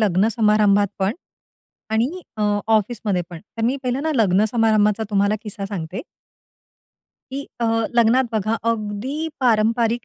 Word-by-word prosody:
लग्नसमारंभात 210 0 +3
पण 195 +2 +1 0.8
आणि 245 +12 0 0.2
अ, 210 - -2 0.2
ऑफिसमध्ये 215 -3 +1
पण. 165 - -8
तर 225 +2 -9
मी 260 - +1
पहिलं 255 +2 -1
ना, 315 0 0
लग्नसमारंभाचा 215 +1 +3
तुम्हाला 200 +1 +2
किस्सा 205 -2 -5
सांगते. 185 -2 -5 1.3
की 275 +1 -3 0.2
अ, 230 - +1 0.3
लग्नात 240 +3 +4
बघा 215 +1 0 0.2
अगदी 215 +6 -4 0.2
पारंपारिक 230 0 +2
215 Hz, 120 wpm, -21 LUFS, 205-235 Hz, 1.3 s, लग्नात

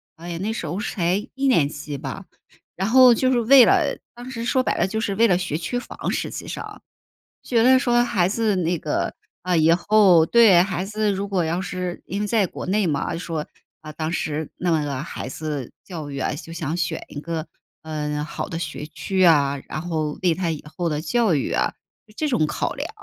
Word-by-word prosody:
哎 170 +1 -9
呀， 170 - -4
那 220 +3 -1
时 - - -4
候 175 +6 -3
是 - - -3
才 175 -1 +1 0.2
一 270 +1 0
年 165 - +4
级 145 -1 -6
吧， - - -7 0.5
然 190 +3 -1
后 255 0 +8
就 255 +2 +1
是 240 - +2
为 255 +2 +8
了 - - +2 0.2
当 245 +2 -9
时 230 -1 -5
说 255 +1 +2
白 - - 0
了 - - +2
就 220 +3 -2
是 205 - -1
为 230 +2 +4
了 180 -4 +3
学 180 -4 -2
区 245 +8 -3
房 245 - -5
实 - - -2
际 - - -7
上。 - - -7 0.6
觉 230 -2 +2
得 260 +1 +6
说 240 -2 +3
孩 180 -6 +1
子 215 -1 0
那 175 0 0
个， 150 - -2 0.3
啊， 180 0 0
以 160 +1 +4
后， 180 -2 +5
对 220 -6 +6
孩 185 -1 -2
子 210 0 0
如 195 +1 -3
果 185 -3 0
要 170 +3 -1
是 180 -1 -4
因 200 +3 -4
为 210 - 0
在 215 -1 +2
国 - - -7
内 200 +1 +1
嘛， 140 -3 0
啊， - - -2
就 165 - -4
说， 160 -4 -4 0.4
啊， 155 0 -8
当 155 +1 -3
时 155 -2 -2
弄 165 -4 +1
个 140 -3 -3
孩 - - -6
子 145 -2 -5
教 160 -6 -7
育 140 - -5
啊， 140 - -1
就 165 +3 -9
想 165 -1 -3
选 170 -3 -2
一 145 - -7
个， 165 0 -4 0.4
嗯， 150 -1 -3
好 150 - -5
的 165 - -4
学 155 -2 -5
区 190 +5 -3
呀， 140 -5 +4
然 155 - -4
后 155 -3 -3
为 175 -3 +4
他 175 -1 -1
以 155 -2 -5
后 175 -1 -1
的 150 -2 -1
教 195 +2 +2
育 135 - -2
啊 - - +1 0.4
是 215 - -19
这 305 - -1
种 155 - +1
考 - - -2
量， - - -4
175 Hz, 245 characters per minute, -23 LUFS, 155-215 Hz, 0.6 s, 后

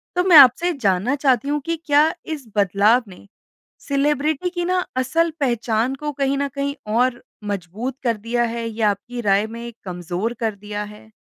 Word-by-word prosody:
तो 360 - +2
मैं 355 -4 +7
आपसे 285 +7 +7
जानना 215 0 0
चाहती 265 -2 +1
हूँ 295 0 0
कि 335 0 -1
क्या 300 +1 +4
इस 295 -7 -6
बदलाव 205 +5 +3
ने 190 +1 -14 0.6
सेलिब्रिटी 295 +4 0
की 350 -1 -3
ना 365 0 0
असल 330 +6 +1
पहचान 240 -1 0
को 295 +2 -4
कहीं 275 0 -1
ना 280 0 0
कहीं 280 0 -1 0.2
और 245 +1 +1 0.2
मज़बूत 205 +6 -4
कर 230 -3 +1
दिया 235 +3 -1
है 230 -1 -3
या 220 -1 0
आपकी 240 +5 -6
राय 205 0 +2
में 235 +1 -7
कमज़ोर 180 +5 -3
कर 220 -2 -1
दिया 210 +1 -5
है? 210 +1 -13
245 Hz, 175 wpm, -21 LUFS, 210-285 Hz, 0.6 s, मैं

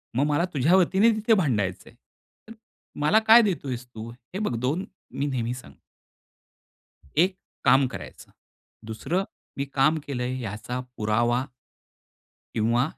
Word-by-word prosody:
मग 140 - +3
मला 150 +4 +2
तुझ्यावतीने 185 - +4
ते 220 - +2
तिथे 220 +1 +2
भांडायचंय. 105 - 0 0.5
तर 225 - -10 0.5
मला 175 +9 +4
काय 230 +2 +9
देतोयेस 135 - -2
तू? 115 -1 -8
हे 125 - -9
बघ 210 - -1
2 135 +11 -1 0.3
मी 140 - -1
नेहमी 125 -4 -1
सांगतो. 125 - -12 1.4
एक 185 +3 +4 0.3
काम 135 0 +5
करायचं, - - -10 0.5
दुसरं 165 - -2 0.3
मी 140 - -1
काम 150 +4 +3
केलंय 130 -1 -3
याचा 115 +3 -5 0.2
पुरावा 120 +4 +1 1.1
किंवा 115 +3 +2
135 Hz, 125 wpm, -25 LUFS, 120-180 Hz, 1.4 s, काय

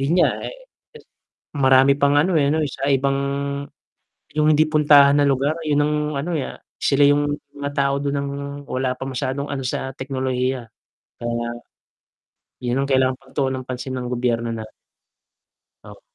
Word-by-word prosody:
Yun 135 +3 0
nga - - +5 0.2
eh. - - -7 1.0
Marami 135 0 +5
pang 140 0 +4
ano 175 +6 +3
eh 140 - +2
'no 160 - +1
sa 135 0 -3
ibang, 135 0 +2 1.2
yung 155 0 +3
hindi 155 +1 +5
puntahan 145 -2 +6
na 145 - +3
lugar 140 +3 +1
yun 145 -1 +2
ng 150 0 0 0.2
ano, 150 +6 -3
ah, - - -6 0.2
sila 140 0 +3
yung 145 0 +2 0.2
mga 145 0 -3
tao 140 -1 +2
dun 140 0 -1
ng, 140 0 -2 0.4
wala 130 0 -1
pa - - -6
masyadong 135 +2 -3
ano 140 - -2
sa 130 +1 -3
teknolohiya, 130 -1 -2 0.6
kaya. 120 0 -2 1.1
Yun 125 +2 0
ang - - -5
kailangang 130 -1 +2
pagtuonan 130 -1 -2
ng - - -37
pansin 130 +1 -5
ng 125 -1 -4
gobyerno 120 -1 0
natin. 110 -1 -6 1.1
Ah. - - -13
135 Hz, 155 wpm, -21 LUFS, 130-145 Hz, 1.2 s, puntahan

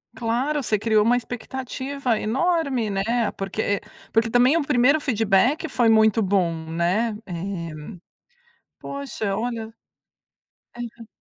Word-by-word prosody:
Claro, 255 +6 -1
você 215 -3 +1
criou 215 -1 +3
uma 240 +2 +3
expectativa 255 +1 -3
enorme, 270 -1 0
né, 215 +3 0
porque 200 +1 -1 0.3
porque 225 0 +2
também 245 +6 +4
o 330 - +1
primeiro 265 +4 +4
feedback 235 +6 +2
foi 240 -3 +2
muito 220 0 +4
bom, 185 -3 +2 0.2
né, 185 +7 0
eh, 170 -4 -5 0.9
poxa, 250 -8 -4
olha 225 0 -3 1.0
Aham. 235 -1 -8
225 Hz, 110 wpm, -23 LUFS, 205-255 Hz, 1.0 s, também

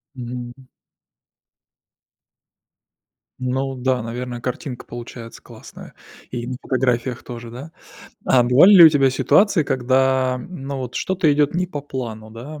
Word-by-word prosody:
Мгм. 120 -1 -7 2.8
Ну, 130 +1 -2
да, 130 -1 -1
наверное, 120 +1 -6
картинка 125 +1 -5
получается 120 -1 -9
классная, - - -13 0.4
и 120 -1 -5
на 130 0 -4
фотографиях 125 -1 -1
тоже, 120 -1 -9
да? 135 +7 -10 0.5
А 125 - +4
бывали 130 +11 +6
ли 175 -3 +10
у - - +11
тебя 140 -3 +3
ситуации, 195 +7 +3
когда, 130 -1 +1
ну, 140 -6 -6
вот 125 -2 -6
что-то 185 -4 +1
идёт 145 +1 +1
не 180 +1 0
по 150 -5 -6
плану, 115 -6 -7
да. 135 +7 -9
130 Hz, 130 wpm, -21 LUFS, 120-140 Hz, 2.8 s, у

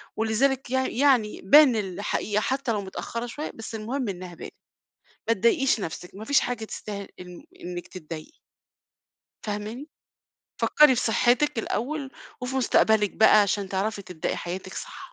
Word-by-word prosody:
ولذلك 245 +5 +1
يع 260 0 +1
يعني 250 -5 +2
بان 270 +5 +7
الحقيقة 205 +1 -1
حتى 265 0 -1
لو 210 -2 -1
متأخرة 230 +4 -5
شوية 290 +6 -5
بس 225 0 -8
المهم 235 +2 -3
إنها 180 -2 -7
بانت، - - -9 0.7
ما 230 - +4
تضايقيش 235 - +2
نفسِك 180 -1 -6
ما 215 - -8
فيش 285 +4 +4
حاجة 240 -3 -3
تستاهل 200 -2 -7
إم 180 -1 -11 0.2
إنِّك 175 0 -6
تتضايقي. 160 -4 -9 1.1
فاهماني؟ 215 +7 -5 0.7
فكّري 300 -4 +6
في 245 - 0
صحتِك 245 +3 +2
الأول، 270 +5 -3 0.3
وفي 250 +1 -4
مستقبلِك 220 -5 +3
بقى 215 -1 +6
عشان 200 -1 -1
تعرفي 200 +2 -2
تبدئي 180 -4 -4
حياتِك 185 +2 -6
صح. - - -7
220 Hz, 145 wpm, -26 LUFS, 195-255 Hz, 1.1 s, بان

